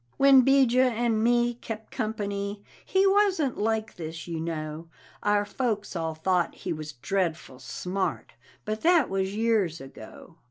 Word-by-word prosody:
When 275 Hz, -1 st, +7 dB
'Bijah 255 Hz, -1 st, +4 dB
and 225 Hz, -1 st, +1 dB
me 240 Hz, 0 st, +3 dB
kep' 225 Hz, -2 st, -8 dB
company, 205 Hz, -3 st, -3 dB, 0.2 s
he 380 Hz, +1 st, +2 dB
wasn't 385 Hz, -, +2 dB
like 220 Hz, +1 st, -1 dB
this, 160 Hz, 0 st, -7 dB
you 165 Hz, -2 st, -4 dB
know; 160 Hz, 0 st, -5 dB, 0.3 s
Our 205 Hz, 0 st, +2 dB
folks 210 Hz, -3 st, -2 dB
all 160 Hz, -1 st, -2 dB
thought 175 Hz, +2 st, 0 dB
he -, -, -4 dB
was 155 Hz, -1 st, -7 dB
dreadful 160 Hz, -1 st, -2 dB
smart 180 Hz, -, -3 dB, 0.3 s
but 215 Hz, +1 st, -3 dB
that 335 Hz, -, +4 dB
was 195 Hz, +1 st, -1 dB
years 215 Hz, -7 st, +1 dB
ago. 135 Hz, +5 st, -12 dB
205 Hz, 145 wpm, -27 LUFS, 165-240 Hz, 0.3 s, When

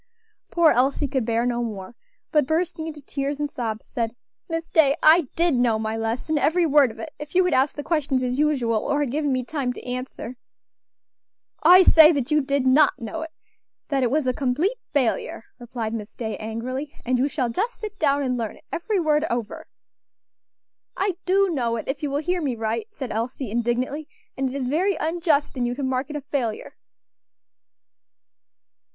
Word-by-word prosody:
Poor 340 Hz, -2 st, +4 dB
Elsie 270 Hz, +4 st, +2 dB
could 265 Hz, -3 st, -1 dB
bear 230 Hz, +1 st, +1 dB
no 240 Hz, -1 st, 0 dB
more, 210 Hz, -3 st, -5 dB, 0.4 s
but 300 Hz, -5 st, +3 dB
bursting 320 Hz, 0 st, -1 dB
into 305 Hz, -2 st, -7 dB
tears 280 Hz, +1 st, -3 dB
and 295 Hz, -, 0 dB
sobs, 225 Hz, -3 st, -4 dB
said: 230 Hz, -2 st, -3 dB, 0.3 s
"Miss 330 Hz, 0 st, -4 dB
Day, 285 Hz, -4 st, +4 dB
I 315 Hz, -1 st, +6 dB
did 340 Hz, -1 st, +2 dB
know 245 Hz, -3 st, +2 dB
my 220 Hz, 0 st, -2 dB
lesson, 230 Hz, +7 st, -1 dB
every 330 Hz, +5 st, +2 dB
word 290 Hz, -4 st, +5 dB
of 220 Hz, -, -11 dB
it, 225 Hz, -, -7 dB
if 295 Hz, +3 st, -9 dB
you 370 Hz, 0 st, +5 dB
had 360 Hz, -, +1 dB
asked 265 Hz, +2 st, +2 dB
the 290 Hz, -, -5 dB
questions 285 Hz, -4 st, 0 dB
as 250 Hz, +2 st, -1 dB
usual, 255 Hz, -7 st, +2 dB
or 285 Hz, +6 st, 0 dB
had 280 Hz, -5 st, -1 dB
given 295 Hz, 0 st, 0 dB
me 255 Hz, -1 st, -1 dB
time 275 Hz, -3 st, -2 dB
to -, -, -10 dB
answer." 250 Hz, -1 st, -6 dB, 1.2 s
"I 360 Hz, +4 st, +8 dB
say 320 Hz, -2 st, +8 dB
that 280 Hz, -1 st, -2 dB
you 300 Hz, 0 st, +4 dB
did 275 Hz, -1 st, 0 dB
not 270 Hz, +4 st, +5 dB
know 240 Hz, +8 st, -5 dB
it; 320 Hz, -, -5 dB, 0.6 s
that 275 Hz, -2 st, +1 dB
it 250 Hz, -, +2 dB
was 295 Hz, +2 st, +1 dB
a 255 Hz, -, +1 dB
complete 290 Hz, -, 0 dB, 0.2 s
failure," 250 Hz, -4 st, 0 dB, 0.2 s
replied 235 Hz, -2 st, -5 dB
Miss 215 Hz, -2 st, -6 dB
Day, 220 Hz, -3 st, -4 dB
angrily; 255 Hz, +6 st, -5 dB
"and 250 Hz, 0 st, +1 dB
you 270 Hz, -, +2 dB
shall 260 Hz, -4 st, -1 dB
just 430 Hz, -, -2 dB
sit 420 Hz, -2 st, -7 dB
down 285 Hz, -2 st, +2 dB
and 250 Hz, -2 st, -1 dB
learn 225 Hz, -2 st, -3 dB
it, -, -, -20 dB
every 395 Hz, +4 st, -1 dB
word, 305 Hz, -2 st, +2 dB
over." 235 Hz, -2 st, -4 dB, 1.3 s
"I 385 Hz, -2 st, 0 dB
do 390 Hz, 0 st, +3 dB
know 240 Hz, -7 st, 0 dB
it, 225 Hz, -, -5 dB
if 270 Hz, +1 st, -3 dB
you 295 Hz, -, -1 dB
will 280 Hz, -, -1 dB
hear 355 Hz, +2 st, 0 dB
me 270 Hz, -5 st, -1 dB
right," 225 Hz, -, -2 dB
said 270 Hz, -, -6 dB
Elsie, 230 Hz, +1 st, -3 dB
indignantly, 245 Hz, +6 st, -1 dB, 0.3 s
"and 265 Hz, 0 st, -1 dB
it 260 Hz, -, -7 dB
is 265 Hz, -3 st, -2 dB
very 355 Hz, +8 st, +1 dB
unjust 320 Hz, -3 st, 0 dB
in 245 Hz, -2 st, 0 dB
you 245 Hz, -, -2 dB
to 280 Hz, -, -4 dB
mark 260 Hz, +1 st, -1 dB
it 300 Hz, -, -6 dB
a 295 Hz, -, -3 dB
failure." 260 Hz, -6 st, -3 dB
275 Hz, 195 wpm, -24 LUFS, 240-310 Hz, 1.3 s, I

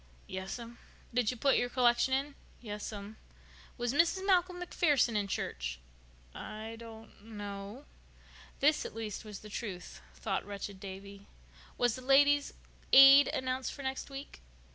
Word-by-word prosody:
"Yes'm." 230 Hz, +6 st, -7 dB, 0.3 s
"Did 240 Hz, -3 st, +2 dB
you 250 Hz, -, -3 dB
put 275 Hz, +3 st, +3 dB
your 245 Hz, -, 0 dB
collection 245 Hz, 0 st, +3 dB
in?" 275 Hz, +2 st, 0 dB, 0.3 s
"Yes'm." 210 Hz, -1 st, -7 dB, 0.6 s
"Was 240 Hz, 0 st, -1 dB
Mrs. 340 Hz, +5 st, +2 dB
Malcolm 365 Hz, -2 st, +2 dB
MacPherson 295 Hz, -9 st, +2 dB
in 205 Hz, -1 st, 0 dB
church?" -, -, -4 dB, 0.5 s
"I 215 Hz, +1 st, -7 dB
don't 225 Hz, -2 st, -12 dB
know." 205 Hz, +3 st, -8 dB, 0.8 s
This, 300 Hz, +2 st, +4 dB
at -, -, -8 dB
least, 220 Hz, -2 st, -5 dB
was 210 Hz, -2 st, -9 dB
the 215 Hz, -, -10 dB
truth, 200 Hz, -5 st, -6 dB
thought 195 Hz, -3 st, -2 dB
wretched 200 Hz, -1 st, -7 dB
Davy. 200 Hz, +1 st, -9 dB, 0.5 s
"Was 245 Hz, -2 st, +2 dB
the 255 Hz, -, -8 dB
Ladies' 285 Hz, +2 st, +4 dB, 0.4 s
Aid 275 Hz, +1 st, +10 dB
announced 260 Hz, 0 st, -2 dB
for 280 Hz, -, -9 dB
next 265 Hz, +1 st, -4 dB
week?" 275 Hz, +1 st, -9 dB
235 Hz, 140 wpm, -32 LUFS, 205-270 Hz, 0.8 s, Aid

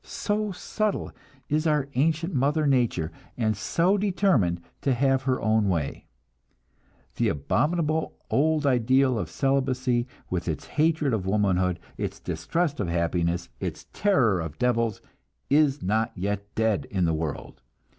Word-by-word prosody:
So 210 Hz, 0 st, -2 dB
subtle 210 Hz, +3 st, -2 dB, 0.4 s
is 155 Hz, +2 st, +1 dB
our 150 Hz, -3 st, +2 dB
ancient 160 Hz, +6 st, +1 dB
mother 145 Hz, +3 st, +2 dB
nature, 120 Hz, -, +1 dB, 0.3 s
and 110 Hz, -3 st, +1 dB
so 175 Hz, -, +1 dB
determined 180 Hz, -, +2 dB, 0.2 s
to 135 Hz, -3 st, +1 dB
have 135 Hz, +1 st, +2 dB
her 130 Hz, -1 st, 0 dB
own 110 Hz, -2 st, +2 dB
way! 80 Hz, -6 st, -2 dB, 1.1 s
The -, -, +2 dB
abominable 155 Hz, -, 0 dB, 0.2 s
old 155 Hz, +1 st, +2 dB
ideal 130 Hz, -1 st, +3 dB
of 90 Hz, -5 st, -4 dB
celibacy, 130 Hz, -, 0 dB, 0.2 s
with 90 Hz, -2 st, -3 dB
its 80 Hz, -, -3 dB
hatred 155 Hz, -3 st, +1 dB
of 95 Hz, -4 st, -1 dB
womanhood, 95 Hz, -3 st, +1 dB, 0.2 s
its -, -, -3 dB
distrust 140 Hz, -, -2 dB
of 100 Hz, -, -1 dB
happiness, 85 Hz, 0 st, 0 dB
its -, -, -5 dB
terror 130 Hz, -, +3 dB
of 80 Hz, -2 st, -5 dB
devils, 115 Hz, -3 st, 0 dB, 0.5 s
is 145 Hz, -1 st, +3 dB
not 110 Hz, +4 st, +1 dB
yet 100 Hz, +2 st, -3 dB
dead 110 Hz, -3 st, +1 dB
in 95 Hz, -3 st, +1 dB
the 80 Hz, -, +1 dB
world. 80 Hz, -2 st, -4 dB
125 Hz, 135 wpm, -26 LUFS, 95-150 Hz, 1.1 s, ideal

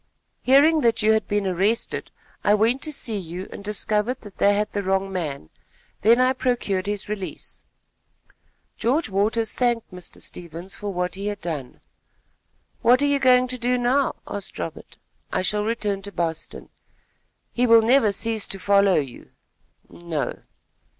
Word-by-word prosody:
Hearing 295 Hz, +5 st, +5 dB
that 230 Hz, -3 st, +2 dB
you 215 Hz, -, +5 dB
had 220 Hz, -1 st, +1 dB
been 205 Hz, -1 st, 0 dB
arrested, 195 Hz, +5 st, 0 dB, 0.3 s
I 205 Hz, -, +5 dB
went 230 Hz, +5 st, +2 dB
to 310 Hz, -, -2 dB
see 225 Hz, -7 st, -3 dB
you 180 Hz, +1 st, -6 dB
and -, -, -9 dB
discovered 210 Hz, +4 st, 0 dB
that 205 Hz, -4 st, -13 dB
they 205 Hz, 0 st, +4 dB
had 210 Hz, +1 st, -1 dB
the 205 Hz, -, -2 dB
wrong 195 Hz, 0 st, 0 dB
man; 145 Hz, -, -4 dB, 0.5 s
then 230 Hz, +3 st, +5 dB
I 255 Hz, +1 st, +4 dB
procured 235 Hz, -7 st, -1 dB
his 205 Hz, -1 st, -3 dB
release." 205 Hz, -3 st, -6 dB, 1.1 s
George 260 Hz, +5 st, +1 dB
Waters 215 Hz, +3 st, +1 dB
thanked 240 Hz, -5 st, 0 dB
Mr. 180 Hz, -1 st, -9 dB
Stevens 170 Hz, +2 st, -7 dB
for 205 Hz, -1 st, -5 dB
what 180 Hz, -1 st, -2 dB
he 195 Hz, +2 st, -4 dB
had 205 Hz, -1 st, -3 dB
done. 155 Hz, -8 st, -5 dB, 1.0 s
"What 250 Hz, +4 st, +5 dB
are -, -, +4 dB
you 285 Hz, -1 st, +2 dB
going 255 Hz, -1 st, +5 dB
to 255 Hz, 0 st, -3 dB
do 250 Hz, +1 st, +1 dB
now?" 250 Hz, +3 st, +1 dB
asked -, -, -6 dB
Robert. -, -, -7 dB, 0.3 s
"I -, -, 0 dB
shall 210 Hz, +2 st, 0 dB
return 210 Hz, -3 st, -1 dB
to 200 Hz, +1 st, -8 dB
Boston." 165 Hz, -3 st, -4 dB, 0.8 s
"He 245 Hz, +1 st, +2 dB
will 230 Hz, -1 st, +7 dB
never 230 Hz, -2 st, +4 dB
cease 220 Hz, +1 st, -1 dB
to 195 Hz, -, -2 dB
follow 200 Hz, 0 st, +4 dB
you." 135 Hz, -5 st, -4 dB, 0.6 s
"No." 170 Hz, -4 st, -4 dB
210 Hz, 160 wpm, -23 LUFS, 190-240 Hz, 1.1 s, will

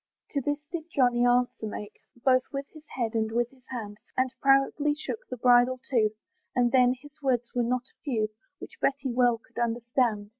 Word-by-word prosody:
To 280 Hz, -, 0 dB
this 290 Hz, +2 st, 0 dB
did 335 Hz, -3 st, -4 dB
Johnny 245 Hz, -4 st, +3 dB
answer 245 Hz, -2 st, +1 dB
make, 210 Hz, 0 st, -7 dB, 0.2 s
Both 255 Hz, +1 st, +3 dB
with 275 Hz, -1 st, -3 dB
his 310 Hz, -, -12 dB, 0.2 s
head, 235 Hz, -3 st, -1 dB
and 220 Hz, -1 st, 0 dB
with 240 Hz, +1 st, 0 dB
his 260 Hz, -2 st, -24 dB
hand, 210 Hz, -5 st, -6 dB, 0.2 s
And 255 Hz, 0 st, +1 dB
proudly 275 Hz, +2 st, +3 dB
shook 370 Hz, +8 st, -5 dB
the -, -, -5 dB
bridle 245 Hz, +1 st, +5 dB
too, 225 Hz, -4 st, +4 dB, 0.5 s
And 245 Hz, -1 st, +3 dB
then! 250 Hz, -1 st, +5 dB
his 290 Hz, +2 st, -16 dB
words 245 Hz, -3 st, 0 dB
were 245 Hz, -, +1 dB
not 245 Hz, +1 st, 0 dB
a 260 Hz, -, -25 dB
few, 225 Hz, -7 st, 0 dB, 0.3 s
Which -, -, -11 dB
Betty 275 Hz, -1 st, 0 dB
well 245 Hz, -1 st, +3 dB
could 230 Hz, -, -11 dB
understand. 235 Hz, -2 st, 0 dB
245 Hz, 190 wpm, -28 LUFS, 235-270 Hz, 0.5 s, bridle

